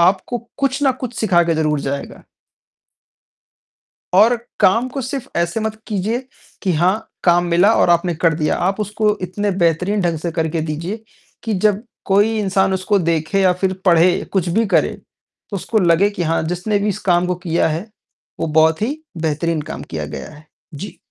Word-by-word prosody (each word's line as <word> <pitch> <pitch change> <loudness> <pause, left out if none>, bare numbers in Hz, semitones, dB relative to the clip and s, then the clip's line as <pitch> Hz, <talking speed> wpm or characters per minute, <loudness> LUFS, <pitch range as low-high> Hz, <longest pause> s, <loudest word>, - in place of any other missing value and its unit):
आपको 190 +7 +2 0.2
कुछ 275 0 0
ना 265 -2 +4
कुछ 245 -1 -4
सिखाकर 175 -5 +3
ज़रूर 155 -2 0
जाएगा। 140 0 -5 1.9
और 220 +6 +6 0.2
काम 230 +7 +4
को 270 - -4
सिर्फ़ 260 +1 -4
ऐसे 170 +5 0
मत 220 0 -2
कीजिए 225 +5 -2 0.3
कि 185 -4 +1
हाँ, 185 +7 +1
काम 175 0 +4
मिला 180 +6 +5
और - - +3
आपने 170 0 +2
कर 165 +1 +2
दिया। 150 0 0
आप 195 +4 0
उसको 210 0 0
इतने 200 +3 -2
बेहतरीन 180 +3 +1
ढंग 170 -2 0
से 170 +1 -3
करके 160 -1 -1
दीजिए 165 +8 -4 0.4
कि 225 -2 -1
जब 205 +2 +1 0.2
कोई 205 +3 +3
इंसान 190 -1 +1
उसको 190 +2 +1
देखे 165 +2 0
या 185 -1 +4
फ़िर 190 +1 -1
पढ़े 175 0 +4
कुछ 185 -3 +1
भी 220 +6 +2
करे, - - +2 0.6
तो 205 - -4
उसको 220 +4 0
लगे 175 +3 +4
कि 200 -4 -3
हाँ 165 +1 +1
जिसने 180 +4 -1
भी 210 - 0
इस 200 - -3
काम 175 0 +3
को 180 - 0
किया 165 +1 +2
है 160 +7 -3 0.5
वो - - -1
बहुत 160 +3 +3
ही 275 +8 -1 0.2
बेहतरीन 160 +1 0
काम - - -7
किया - - -3
गया - - -7
है। 150 +1 -16 0.3
जी। 180 +5 -8
185 Hz, 180 wpm, -19 LUFS, 170-210 Hz, 1.9 s, और